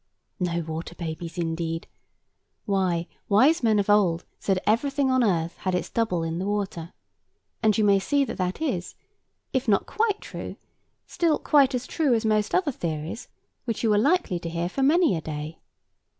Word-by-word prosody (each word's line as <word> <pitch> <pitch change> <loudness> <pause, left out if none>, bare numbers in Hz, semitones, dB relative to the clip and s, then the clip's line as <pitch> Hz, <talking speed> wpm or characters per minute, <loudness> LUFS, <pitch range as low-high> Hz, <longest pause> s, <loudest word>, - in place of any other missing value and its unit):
No 170 -2 0
water 160 +1 -6
babies, 165 0 -6
indeed? 165 -1 -2 0.8
Why, 185 -4 +1 0.2
wise 265 +11 +5
men 220 -3 +3
of 200 - +1
old 190 -5 +3
said 195 -2 +1
that - - -7
everything 270 +5 +2
on 255 -1 +3
earth 170 -5 0
had 185 -1 -1
its 180 - -3
double 185 -8 0
in 165 +1 -3
the 190 - -2
water; 195 -5 -3 0.7
and 215 -3 +3
you 215 - +3
may 200 -1 +5
see 280 +8 +1
that - - -6
that 185 - -2
is, 185 - -2 0.6
if 260 0 0
not 200 -2 +3
quite 430 -2 0
true, - - -7 0.5
still 330 -3 +1
quite 280 -3 +3
as 250 0 -3
true 290 -7 +1
as 225 0 -1
most 215 -1 +1
other 365 -5 +2
theories 165 - -4 0.4
which 230 -2 -3
you 220 -2 +3
are 205 - +4
likely 285 - +2
to 170 - -5
hear 170 +1 -2
for 270 - -3
many 310 - +4
a 160 - -3
day. 155 +1 -6
200 Hz, 180 wpm, -25 LUFS, 170-255 Hz, 0.8 s, wise